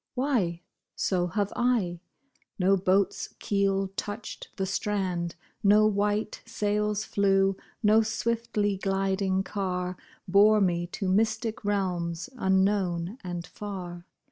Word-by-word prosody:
Why, 230 -11 0 0.3
so 180 -2 0
have 200 +3 -1
I! 225 -9 +1 0.6
No 195 +1 +4
boat's 190 +1 +1
keel 195 -1 +1
touched 205 +3 -5
the 190 - -1
strand, 185 -4 -1 0.3
No 210 +1 +6
white 205 0 0
sails 210 -1 -1
flew, 195 -1 +2 0.3
no 215 +1 +6
swiftly 220 -2 -1
gliding 195 0 0
car 185 -3 -2 0.3
Bore 205 +3 +6
me 175 -3 +1
to 190 +2 -4
mystic 220 +3 +1
realms, 180 -5 -1
unknown 190 -1 +1
and 175 -2 -4
far. 180 -4 -7
195 Hz, 110 wpm, -28 LUFS, 185-210 Hz, 0.6 s, No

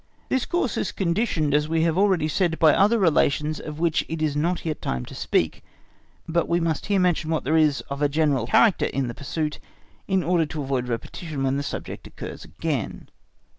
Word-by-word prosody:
This 260 -2 0
course 345 - 0
is - - -1
conditioned 170 -5 0
as 150 +1 +2
we 160 0 +2
have 165 -1 +2
already 190 -5 +3
said, 165 +1 0
by 155 -2 +5
other 210 +4 +4
relations 155 -4 +2
of 150 -1 -7
which 165 -2 +1
it 165 - -3
is 155 -2 0
not 170 +5 -1
yet 155 -2 -3
time 65 0 -2
to - - -11
speak. - - -1 0.6
But 170 0 0
we 170 0 +2
must 165 -3 -1
here 200 -1 +2
mention, 175 -3 +1
what 160 -1 0
there 155 +5 +1
is 155 -3 +3
of 140 +1 -7
a 145 - +3
general 145 -5 +1
character 205 - +4
in 135 -2 -2
the - - -4
pursuit 150 +2 -3 0.5
in 190 -2 +1
order 165 -1 +2
to 150 -1 -4
avoid 130 -2 -1
repetition 135 +5 -4
when 135 0 +1
the - - -1
subject 145 - -6
occurs - - -8
again. 130 - -4
155 Hz, 205 wpm, -24 LUFS, 145-170 Hz, 0.6 s, by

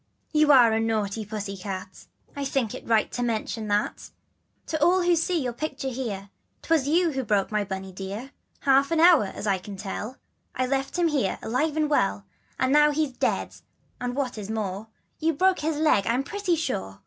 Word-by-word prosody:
" - - -43
T 305 - +2
T'OUa.re. 250 -7 +6
a - - +1
naughty 220 -1 -1
pussy 205 -1 -5
cat, 190 0 -6
J^ - - -15 0.3
I 280 - -2
think 265 -5 -1
it - - -9
right 225 -2 +2
to 245 - -3
mention 225 -1 -2
that, 205 0 -1 0.6
To 315 -2 -1
all 360 +2 +4
who 350 0 +4
see 335 +1 +1
your 250 -4 -2
picture 275 0 -4
here, 210 -6 -5
' - - -45
Twas 320 -4 +2
you 335 +2 +3
who 265 -2 -2
broke 205 -2 +1
my 210 -1 +1
Bunny 190 -1 -6
dear. 200 +8 -6 0.3
An 275 +4 +4
hour 335 -9 +7
ago, 190 - -6
as - - -5
you 195 -2 +1
can 195 +1 -9
tell, 210 +5 -5 0.4
I 255 - +1
left 270 +3 -1
him 345 -2 +3
here, 265 -11 0
alive 290 +7 0
and 305 -1 +2
well; 100 - +1 0.3
And 260 +1 +2
now 300 0 +6
he's 300 -1 0
dead 250 - -1 0.4
and, 245 0 -3
what 260 -5 -2
is 205 0 -7
more, 210 -1 -3 0.3
You've 320 -2 0
broke 375 +2 +3
his 310 0 -1
leg 300 -10 +3
I'm 245 +4 +1
pretty 400 +2 -1
sure. 95 - -3
250 Hz, 205 wpm, -26 LUFS, 205-300 Hz, 0.6 s, hour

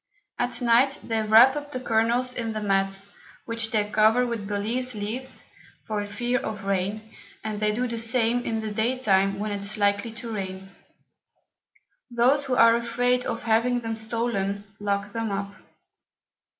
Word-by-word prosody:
At 245 0 -2
Night 245 +4 +4
they 225 -1 -1
wrap 225 +5 +7
up 290 0 -5
the 255 - -3
Kernels 240 +1 +1
in 230 -3 -3
the 215 - -3
Mats, 195 -1 0 0.3
which 230 -1 -3
they 215 -2 +2
cover 220 +4 +4
with 230 -4 -4
Balize 225 +5 -1
Leaves 225 +6 -4 0.4
for 210 -2 -3
fear 240 +4 -1
of 215 -7 -5
Rain, 200 +3 -2 0.3
and 215 -1 -3
they 210 0 +2
do 245 +4 -1
the 230 -1 -4
same 230 +1 +1
in 225 -2 -2
the 215 -1 -4
day 225 +5 0
time 195 -4 +2
when 210 +1 -3
it 200 -1 -3
is 205 +2 -2
likely 205 +2 +1
to 230 0 -6
rain. 190 -1 -6 1.4
Those 250 +4 +3
who 260 -2 0
are 230 -1 +6
afraid 245 +1 0
of - - -3
having 235 +2 +2
them 225 -1 -3
stolen, 220 -3 -2 0.2
lock 200 0 -2
them 225 -1 -2
up. 200 0 -3
225 Hz, 165 wpm, -25 LUFS, 205-240 Hz, 1.4 s, wrap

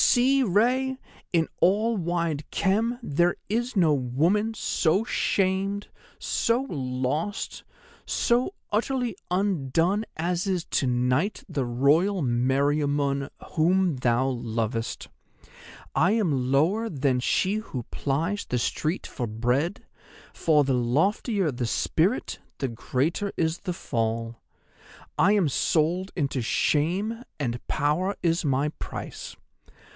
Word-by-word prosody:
See, 270 +2 +4
Rei, 250 +6 +2 0.3
in 165 -2 +2
all 215 +6 +3
wide 170 -4 -1
Khem 220 +5 +1
there 175 +5 +1
is 235 +3 -1
no 165 -5 +5
woman 165 - +1
so 190 -1 +1
shamed, 195 -1 0 0.3
so 230 +2 +1
lost, 135 - -2 0.4
so 245 +10 +1 0.2
utterly 240 0 0
undone 180 +1 +1
as 175 +3 -1
is 185 -3 -1
to 135 - 0
night 125 - +1
the 145 -6 -2
Royal 150 +10 +2
Meriamun, 140 +3 +1 0.2
whom 175 -1 +2
thou 125 +1 +2
lovest. 115 -2 -3 0.9
I 175 +9 +3
am 145 - +1
lower 190 +12 +2
than 135 -5 +1
she 190 +10 +1
who 135 - -5
plies 160 - -2
the 125 - 0
street 155 +8 -1
for 120 - -4
bread, 125 - -1 0.5
for 150 -3 +3
the 135 -1 0
loftier 165 - +1
the 120 -2 -3
spirit - - 0 0.2
the 135 - -1
greater 140 - -1
is 160 +1 0
the 180 - -4
fall. 115 -4 -2 0.8
I 200 - +5
am 200 -6 +3
sold 170 +6 +1
into 140 -5 -1
shame, 185 - 0 0.2
and 120 -4 -3
power 155 +7 0
is 170 0 +2
my 140 0 +1
price. - - -7
160 Hz, 115 wpm, -26 LUFS, 135-200 Hz, 0.9 s, no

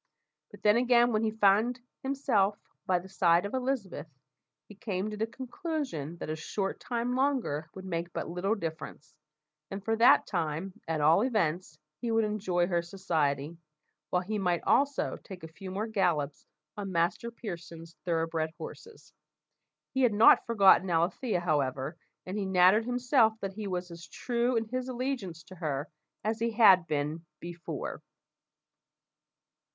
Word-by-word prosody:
But 205 - -15
then, 210 +1 +5
again, 240 0 +4
when 215 - +2
he 220 - +1
found 220 +3 +3 0.2
himself 255 -7 +1 0.3
by 185 - +3
the 175 +2 -7
side 175 -2 +3
of 200 - -5
Elizabeth, 250 - -2 0.6
he - - -12
came 200 0 -3
to - - -5
the 220 +1 -1
conclusion 255 - -5
that - - -6
a - - -2
short 195 +5 -3
time 240 0 -2
longer 255 - 0
would 190 0 -8
make 170 -1 -3
but - - -4
little 180 +6 -1
difference, 160 -4 -7 0.6
and 195 0 -7
for 225 - +1
that 230 - +6
time, 170 +1 -2
at 160 -2 -1
all 160 +6 +5
events, 185 -9 0 0.2
he 240 - -3
would 225 0 +3
enjoy 195 -5 0
her 175 -1 0
society, 165 -4 -2 0.5
while 180 0 +1
he 210 +3 -2
might 180 -3 0
also 280 0 +1
take 185 -4 -10
a - - -6
few 185 +4 -10
more 200 +4 -2
gallops 170 -10 -1 0.3
on 200 -2 -5
Master 175 +6 0
Pearson's 170 -7 -8
thoroughbred 165 -2 -1
horses. 430 - -11 0.8
He 265 - +1
had 245 -4 +4
not 215 +2 +6
forgotten 195 -4 +5
Alethea, 175 +5 0
however, 140 -2 -1 0.3
and 190 +3 -4
he 200 - -1
nattered 190 +4 +5
himself 245 -2 +3
that 195 -1 -4
he 210 0 -5
was 180 -1 -4
as 170 -1 -10
true 240 +8 -1
in 225 - 0
his 255 +3 -4
allegiance 240 - -4
to 185 - -13
her 145 -2 -3 0.3
as 220 +2 -1
he 230 +1 +1
had 190 -6 +6
been 150 +2 -2 0.2
before. 170 -4 -6
190 Hz, 155 wpm, -30 LUFS, 170-225 Hz, 0.8 s, that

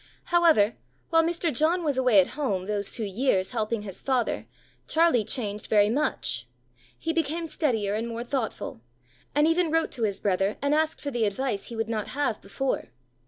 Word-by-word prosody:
However, 315 -12 +5 0.3
while 325 0 +6
Mr. 335 -2 -1
John 335 +6 +2
was 290 -3 +1
away 250 -5 +5
at 185 - +3
home 225 -11 -2
those 205 0 -2
two 230 - -2
years 195 -2 +1
helping 220 -2 -1
his 195 -3 -8
father, 240 - 0 0.4
Charlie 320 -8 +3
changed 210 -2 -3
very 210 -1 +4
much. 225 - -1 0.5
He 325 - -2
became 330 0 -1
steadier 225 -11 0
and 225 +2 -2
more 230 0 -4
thoughtful, 235 - -3 0.5
and 295 +1 +5
even 330 +1 +2
wrote 325 +1 +1
to 245 - -3
his 200 -3 0
brother, 195 +1 0
and 285 +1 +1
asked 315 +1 +1
for 285 - -3
the 240 -3 +1
advice 210 0 -2
he 235 - -7
would 225 0 -1
not 220 -2 -2
have 280 -7 0
before. 260 +7 -2
240 Hz, 180 wpm, -27 LUFS, 205-300 Hz, 0.5 s, while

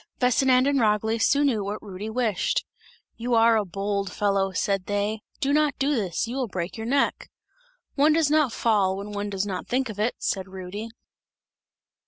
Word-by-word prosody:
Vesinand 255 +1 +4
and 280 -1 +2
Ragli 220 0 +1
soon 285 +5 +3
knew 225 -7 +1
what 205 +2 -4
Rudy 205 +1 -6
wished. 220 -3 0 0.5
"You 240 +1 0
are 230 0 +5
a 215 - +2
bold 200 0 -3
fellow," 195 -2 +1
said 195 0 -1
they, 205 +1 -1 0.2
"do 280 -1 +1
not 300 -1 +2
do 280 +2 +1
this! 195 - -1
You 245 +3 -4
will 260 -3 -1
break 180 -3 -4
your 225 0 -5
neck!" 275 +3 0 0.6
"One 300 +2 +4
does 315 -2 +2
not 305 -5 +3
fall, 200 -5 +1
when 200 +1 -6
one 205 0 -3
does 195 0 -2
not 190 -3 -4
think 260 0 0
of 210 -1 -7
it!" 220 +3 0
said 190 -1 -2
Rudy. 190 +4 -7
215 Hz, 185 wpm, -25 LUFS, 200-255 Hz, 0.6 s, are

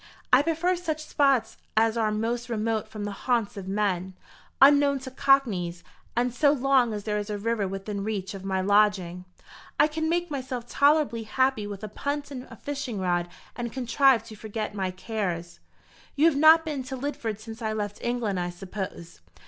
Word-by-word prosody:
I 255 - +8
prefer 330 +4 +1
such 315 -3 -4
spots 270 -6 +2 0.2
as 225 0 +4
are 220 -2 +1
most 230 +3 -2
remote 220 -1 -1
from 210 -1 -7
the 205 - -3
haunts 230 +1 -1
of 195 -2 -7
men, 190 -2 -1 0.4
unknown 285 0 +6
to 260 0 -7
cockneys; 205 -12 +2 0.3
and 245 +1 +1
so 285 +3 +4
long 270 -3 +3
as 210 -1 -4
there 210 0 -1
is 205 +1 -5
a 210 - -2
river 215 -1 -1
within 195 +1 -4
reach 200 -2 -3
of 195 -1 -8
my 190 -1 -1
lodging, 190 -3 +2 0.5
I - - +7
can 315 +1 -2
make 345 0 0
myself 255 -3 -4
tolerably 285 -4 +3
happy 225 -1 0
with 205 0 -7
a - - -3
punt 285 +7 -4
and 255 -2 -7
a - - -10
fishing 280 -7 -4
rod, 175 -1 0 0.3
and 235 -1 -4
contrive 260 -1 +3
to 220 - -11
forget 215 0 -5
my 190 -2 -2
cares." 185 -3 -4 0.6
"You 295 - +3
have 330 -3 +5
not 315 +3 +7
been 295 -4 -3
to 265 +1 -5
Lidford 235 -6 -3
since 225 +1 -9
I 220 -1 -1
left 205 -1 -4
England, 240 -6 -1
I 175 0 -2
suppose?" 180 -1 -7
225 Hz, 185 wpm, -26 LUFS, 200-275 Hz, 0.6 s, I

